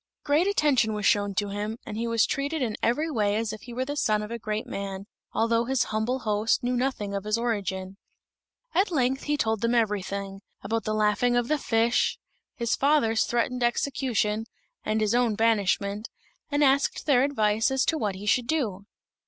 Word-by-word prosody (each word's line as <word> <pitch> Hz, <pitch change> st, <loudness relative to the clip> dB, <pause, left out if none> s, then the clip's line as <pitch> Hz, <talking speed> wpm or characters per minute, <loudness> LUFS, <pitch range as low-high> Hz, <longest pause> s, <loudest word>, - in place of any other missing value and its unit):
Great 305 Hz, +5 st, +2 dB
attention 290 Hz, -, +2 dB
was 210 Hz, -1 st, -3 dB
shown 205 Hz, -1 st, +2 dB
to 205 Hz, +1 st, 0 dB
him, 210 Hz, +2 st, -4 dB
and 210 Hz, -, -6 dB
he 230 Hz, +2 st, -2 dB
was 230 Hz, -1 st, +3 dB
treated 285 Hz, +3 st, -2 dB
in 220 Hz, -4 st, -2 dB
every 300 Hz, +7 st, +1 dB
way 210 Hz, -5 st, +1 dB
as 220 Hz, -1 st, -1 dB
if 215 Hz, -, -8 dB
he 245 Hz, -, -10 dB
were 255 Hz, +2 st, -2 dB
the 290 Hz, +2 st, -4 dB
son 215 Hz, -7 st, +1 dB
of 210 Hz, -, -7 dB
a 235 Hz, -, -4 dB
great 215 Hz, +1 st, -3 dB
man, 195 Hz, -4 st, -5 dB, 0.3 s
although 230 Hz, +1 st, +1 dB
his 265 Hz, 0 st, +1 dB
humble 240 Hz, +4 st, -1 dB
host 215 Hz, +1 st, +1 dB
knew 250 Hz, +1 st, 0 dB
nothing 245 Hz, -5 st, -1 dB
of 200 Hz, -1 st, -3 dB
his 215 Hz, +1 st, 0 dB
origin. 195 Hz, -5 st, -3 dB, 0.8 s
At 385 Hz, +2 st, +2 dB
length 265 Hz, -4 st, 0 dB
he 295 Hz, 0 st, 0 dB
told 220 Hz, -5 st, 0 dB
them 235 Hz, +1 st, +1 dB
everything 200 Hz, -3 st, -1 dB, 0.2 s
about 225 Hz, +3 st, -2 dB
the 215 Hz, -, -1 dB
laughing 215 Hz, +3 st, +2 dB
of 240 Hz, 0 st, +1 dB
the 305 Hz, -1 st, +1 dB
fish, 230 Hz, -1 st, +1 dB, 0.4 s
his 235 Hz, -2 st, 0 dB
father's 270 Hz, -6 st, +2 dB
threatened 245 Hz, +1 st, -1 dB
execution, 240 Hz, -3 st, 0 dB, 0.4 s
and 215 Hz, +1 st, 0 dB
his 215 Hz, 0 st, +1 dB
own 240 Hz, -3 st, +2 dB
banishment 205 Hz, -1 st, +1 dB, 0.4 s
and 290 Hz, 0 st, +2 dB
asked 275 Hz, 0 st, +2 dB
their 275 Hz, -5 st, +4 dB
advice 220 Hz, -5 st, +2 dB
as 265 Hz, 0 st, +1 dB
to 325 Hz, -, +1 dB
what 210 Hz, -10 st, -1 dB
he 195 Hz, +2 st, -8 dB
should 235 Hz, +3 st, +2 dB
do. 215 Hz, -11 st, -2 dB
225 Hz, 195 wpm, -26 LUFS, 210-255 Hz, 0.8 s, their